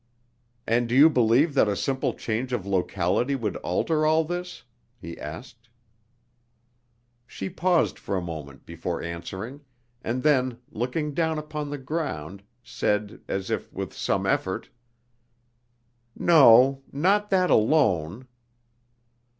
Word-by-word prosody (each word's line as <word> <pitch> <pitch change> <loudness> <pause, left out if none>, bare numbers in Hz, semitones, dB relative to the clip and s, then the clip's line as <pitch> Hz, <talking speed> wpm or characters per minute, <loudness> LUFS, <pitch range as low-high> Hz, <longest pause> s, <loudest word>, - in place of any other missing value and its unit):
"And 115 +1 +1
do 120 - 0
you 150 +4 +7
believe 130 +4 +3
that 135 - +4
a 100 - 0
simple 135 +5 -1
change 120 +3 -3
of 105 -6 -2
locality 95 +6 0
would 110 -7 -3
alter 155 - 0
all 160 +1 +3
this?" 175 +2 -6 0.4
he 85 0 -8
asked. 115 - -9 1.6
She 95 -4 -6
paused 175 0 +1
for 100 - -3
a - - -2
moment 75 -5 -8
before - - -5
answering, 95 - -6 0.4
and 125 +3 -2
then, 130 -5 +2
looking 145 +6 -2
down 160 +1 0
upon 150 -1 -5
the 145 - -4
ground, 130 - -4 0.2
said 105 +1 -2
as 95 -1 -3
if - - -3
with - - -6
some - - -1
effort: - - -1 1.5
"No, 135 -4 +6
not 200 +8 +1
that 185 -2 +2
alone." 110 - +2
125 Hz, 125 wpm, -25 LUFS, 100-150 Hz, 1.6 s, you